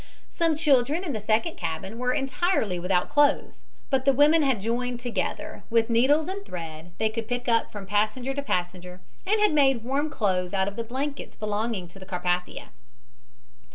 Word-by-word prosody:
Some 330 -2 +1
children 295 +1 +2
in 315 -7 -3
the 220 - -2
second 220 +9 0
cabin 170 +7 -4
were 250 0 +1
entirely 270 - 0
without 180 0 +1
clothes, 290 0 +2 0.3
but 265 -1 +2
the 275 0 +4
women 295 +4 +5
had 270 -6 +2
joined 240 +3 -2
together, 245 -1 -3
and - - -14
with 230 0 +2
needles 280 +7 +3
and 395 +2 -5
thread 165 - -8
they 220 - +2
could 220 0 -4
pick 245 +1 -3
up 230 -1 +2
from 205 -2 -7
passenger 215 +6 0
to 280 - -2
passenger, 180 -5 -3 0.3
had 420 -2 +3
made 270 -5 +3
warm 275 +5 -1
clothes 185 -7 -1
out 190 0 +1
of 200 - -4
the 230 - -3
blankets 275 +5 -5
belonging 210 -2 -2
to 195 - -13
the 190 - -11
Carpathia. 180 -1 -2
235 Hz, 180 wpm, -26 LUFS, 195-280 Hz, 0.3 s, women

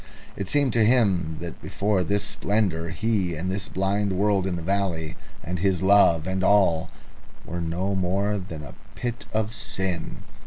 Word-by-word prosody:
It 100 -2 -4
seemed 140 -2 +3
to 115 - +4
him 100 -9 +2
that 85 -2 -7
before 100 -2 0
this 100 +2 0
splendour 100 -4 0
he, 100 -6 0
and 90 +4 -3
this 95 0 -3
blind 100 +1 0
world 100 0 +2
in 90 - -1
the 85 - -5
valley, 90 -4 -1 0.3
and 90 -2 -3
his 95 -1 +1
love, 95 -5 +5
and 95 0 -1
all, 90 -5 +3 0.6
were 85 0 -4
no 90 +4 -1
more 100 +2 0
than 85 -5 -7
a 70 -4 -10 0.2
pit 120 -1 -4
of 110 0 -1
sin. 95 -5 -3
95 Hz, 165 wpm, -25 LUFS, 85-100 Hz, 0.6 s, love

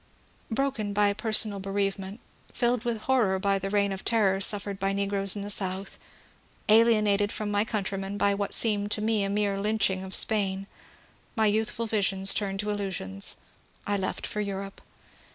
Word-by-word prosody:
Broken 230 -4 -2
by 205 0 +2
personal 215 -1 +1
bereavement, 195 +1 -3 0.3
filled 240 -1 -1
with 230 -3 -2
horror 225 -8 +1
by 195 +1 0
the 195 +1 -4
reign 200 0 +1
of 190 0 -6
terror 195 -4 +1
suffered 200 0 +1
by 195 0 -1
negroes 200 0 0
in 200 - -5
the 205 - -1
South, 195 0 -2 0.7
alienated 210 -2 +3
from 210 -1 -4
my 205 0 +1
countrymen 200 -2 -4
by 200 0 +2
what 200 0 -3
seemed 205 -2 +4
to 210 - -2
me 220 -2 +1
a 195 - -2
mere 200 -1 -1
lynching 200 -2 0
of 190 0 -2
Spain, 195 -3 +2 0.4
— - - -33
my 220 -2 +2
youthful 220 +2 0
visions 195 -3 +3
turned 195 -2 -2
to 210 0 -3
illusions, 185 - 0 0.2
— - - -35
I 205 - -1
left 190 -1 -3
for 210 - -4
Europe. 195 -1 -6
200 Hz, 170 wpm, -27 LUFS, 195-215 Hz, 0.7 s, seemed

